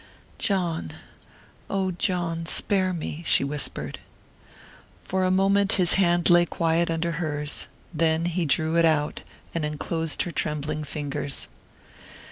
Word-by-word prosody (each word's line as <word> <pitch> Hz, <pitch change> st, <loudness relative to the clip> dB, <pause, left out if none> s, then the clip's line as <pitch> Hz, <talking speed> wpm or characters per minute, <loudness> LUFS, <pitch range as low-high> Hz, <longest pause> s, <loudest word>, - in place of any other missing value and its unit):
"John...oh, 185 Hz, -, -3 dB
John, 170 Hz, -2 st, -2 dB
spare 190 Hz, +1 st, +1 dB
me," 165 Hz, -2 st, -4 dB
she 150 Hz, -, +4 dB
whispered. 145 Hz, +1 st, -3 dB, 1.0 s
For 190 Hz, 0 st, -1 dB
a -, -, +2 dB
moment 195 Hz, +1 st, +3 dB
his 180 Hz, -2 st, +4 dB
hand 175 Hz, -3 st, +3 dB
lay 175 Hz, 0 st, +6 dB
quiet 165 Hz, +1 st, +1 dB
under 165 Hz, +1 st, -1 dB
hers; 150 Hz, -2 st, -2 dB, 0.3 s
then 160 Hz, +1 st, +1 dB
he 175 Hz, -1 st, 0 dB
drew 160 Hz, +3 st, +1 dB
it 170 Hz, -, +5 dB
out, 150 Hz, -2 st, +1 dB, 0.3 s
and 165 Hz, -, -2 dB
enclosed 155 Hz, +1 st, -1 dB
her 175 Hz, -, -5 dB
trembling 150 Hz, -1 st, -2 dB
fingers. 145 Hz, -2 st, -4 dB
165 Hz, 120 wpm, -25 LUFS, 155-180 Hz, 1.0 s, lay